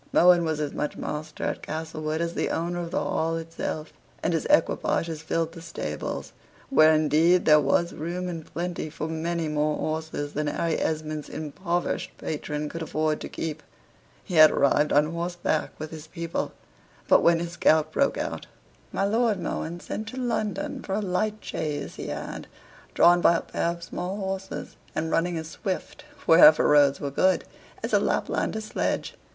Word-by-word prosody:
Mohun 175 0 +6
was 160 -1 -1
as 150 -2 -2
much 150 - -3
master 155 0 -5
at - - -2
Castlewood 155 0 -3
as 170 0 -1
the - - -1
owner 175 +1 -2
of 170 -1 -4
the - - -2
Hall 165 +1 0
itself; 165 -1 -5 0.3
and - - +1
his - - 0
equipages 165 -2 +1
filled 165 0 -1
the 165 0 -10
stables, 165 0 -5 0.4
where, 155 -11 +7
indeed, 155 +3 +4
there 150 -1 +7
was 160 +5 +1
room 175 +4 -4
and 165 -3 -5
plenty 175 -2 -3
for 155 0 -5
many 165 +1 -2
more 150 0 0
horses 155 -2 -3
than 150 +1 -1
Harry 165 +2 0
Esmond's 155 -1 -2
impoverished 170 +3 -3
patron 150 -1 -3
could 165 +3 -6
afford 155 -1 -1
to - - -5
keep. 155 -1 -4 0.6
He - - -8
had 155 -2 +9
arrived 145 +2 +2
on 150 +2 +3
horseback 170 -2 -1
with 155 0 -6
his 155 -1 -9
people; 165 +1 -3 0.6
but - - +6
when 170 0 +5
his 170 0 -4
gout 155 -1 +3
broke 280 - +1
out - - -4 0.4
my 195 - 0
Lord 220 -1 +2
Mohun 170 0 -3
sent 220 - -5
to 255 - -7
London 255 +3 -2
for 190 - -3
a - - +1
light 210 +2 -1
chaise 150 -2 -4
he - - -5
had, - - -5 0.5
drawn 175 0 +6
by 170 - +5
a - - -3
pair - - -2
of 170 0 -5
small 180 +3 -4
horses, 190 -1 -5 0.2
and 160 +1 -1
running 175 0 +1
as 160 -1 -5
swift, 190 - -5 0.2
wherever 155 -1 +8
roads 145 -2 +5
were 140 - -3
good, 185 +6 +3 0.4
as - - -3
a - - +6
Laplander's 220 0 -1
sledge. - - -2
165 Hz, 175 wpm, -26 LUFS, 155-175 Hz, 0.6 s, had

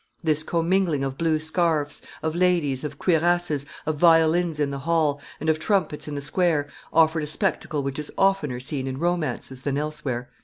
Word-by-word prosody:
"This 155 -2 +2
commingling 170 -2 +1
of 135 -1 -2
blue 160 0 +1
scarfs, 155 -2 0 0.2
of 160 0 -1
ladies, 170 -7 +1
of 150 -2 -5
cuirasses, 170 -4 +1 0.2
of 155 -1 -1
violins 165 -1 +4
in 145 -2 +1
the 140 - -4
hall, 150 -1 +1 0.2
and 155 - -5
of 160 0 +2
trumpets 170 -7 0
in 150 - -4
the 140 - -3
square, 150 0 +1 0.2
offered 160 0 +4
a 150 - -3
spectacle 150 -1 -1
which 140 +1 -3
is 150 - -5
oftener 175 -10 +2
seen 135 0 -3
in 130 0 -4
romances 150 -6 -2
than 140 -1 -1
elsewhere." 145 -5 -3
155 Hz, 180 wpm, -24 LUFS, 145-170 Hz, 0.2 s, violins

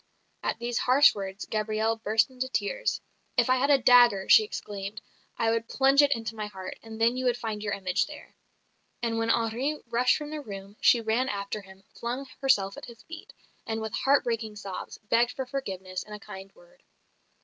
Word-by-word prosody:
At - - -1
these 240 0 -2
harsh 270 +3 +6
words, 195 0 -6
Gabrielle 215 +1 0
burst 220 +3 +1
into 260 0 -4
tears. 210 - -1 0.4
"If 245 +1 +3
I 255 - +4
had 275 +3 +1
a 285 - +7
dagger," 245 -6 +5
she 440 - +8
exclaimed, 205 - -6 0.4
"I 225 - +2
would 230 0 -1
plunge 275 +1 +5
it 285 -1 +3
into 225 -1 -5
my 215 -1 -4
heart, 190 -2 -8
and 225 0 -10
then 230 +2 +3
you 255 - -2
would 245 -1 +2
find 220 -3 -4
your 205 -1 -2
image 185 - 0
there." 300 -1 -12 0.7
And 225 -1 0
when 225 0 0
Henri 235 +7 0
rushed 245 +2 +3
from 300 -1 -7
the 305 -1 -4
room, 200 -4 -9
she 235 - +5
ran 230 +4 0
after 200 0 -4
him, 190 0 -16
flung 245 +4 -4
herself 200 -8 +2
at - - -8
his 235 -2 -13
feet, 330 0 -10 0.4
and 225 0 -2
with 220 -1 -5
heart 275 +4 +3
breaking 225 -3 -3
sobs, 195 -3 -7
begged 230 +3 +3
for 265 - -4
forgiveness 190 -9 -5
and 210 - -9
a - - -9
kind 195 -1 -10
word. - - -22
225 Hz, 200 wpm, -28 LUFS, 210-255 Hz, 0.7 s, she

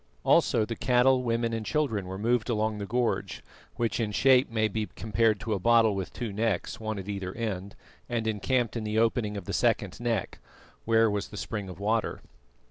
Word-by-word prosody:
Also 110 - +3
the 115 - -4
cattle, 125 +2 +3
women 115 -1 0
and 115 -1 -2
children 110 -8 -1
were 95 +1 -5
moved 115 +3 0
along 110 -2 0
the 100 - -4
gorge, 120 +2 -1 0.3
which 120 -1 -1
in 110 -2 -1
shape 130 +4 +4
may 110 -1 +1
be 110 0 -3
compared 110 0 +1
to 110 0 -2
a 100 - -1
bottle 115 +1 +4
with 95 -2 -4
two 115 -5 -5
necks, 105 -3 -1
one 110 -1 -3
at 95 0 -6
either 100 -2 -4
end, 100 -4 -4 0.3
and 115 -2 -1
encamped 115 +3 0
in 115 - -2
the 105 0 -2
opening 110 -2 +1
of 95 - -7
the - - -4
second - - +1
neck, 115 -5 -2 0.5
where 115 0 +4
was 105 -1 -1
the 105 - -10
spring 100 -2 -4
of 90 -1 -9
water. 110 +2 0
110 Hz, 200 wpm, -28 LUFS, 105-115 Hz, 0.5 s, shape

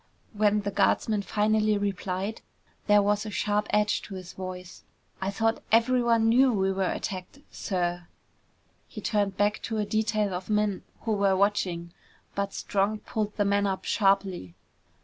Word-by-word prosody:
When 210 0 +2
the 205 0 -3
guardsman 210 +1 +2
finally 215 +1 +1
replied, 200 +1 -3 0.5
there 205 -1 +5
was 205 +1 +1
a 220 - -5
sharp 210 +1 0
edge 210 0 +2
to 195 - -9
his 185 -1 -8
voice. 185 -1 -8 0.4
"I 190 - -1
thought 225 +3 0
everyone 230 0 +3
knew 255 +3 +5
we 195 -3 +1
were 190 -1 0
attacked, 185 +6 -5
sir!" 175 -2 -2 0.8
He - - -9
turned 205 -3 0
back 205 +1 +1
to 225 - -3
a 210 - 0
detail 215 -1 0
of 180 +2 -5
men 210 -2 +1 0.2
who 225 - -2
were 200 -2 +2
watching. 180 -4 0 0.4
But 200 0 -2
Strong 205 +2 -1
pulled 210 -1 -3
the 205 - +2
man 200 0 +2
up 190 -1 -3
sharply. 195 - +1
205 Hz, 155 wpm, -27 LUFS, 190-215 Hz, 0.8 s, there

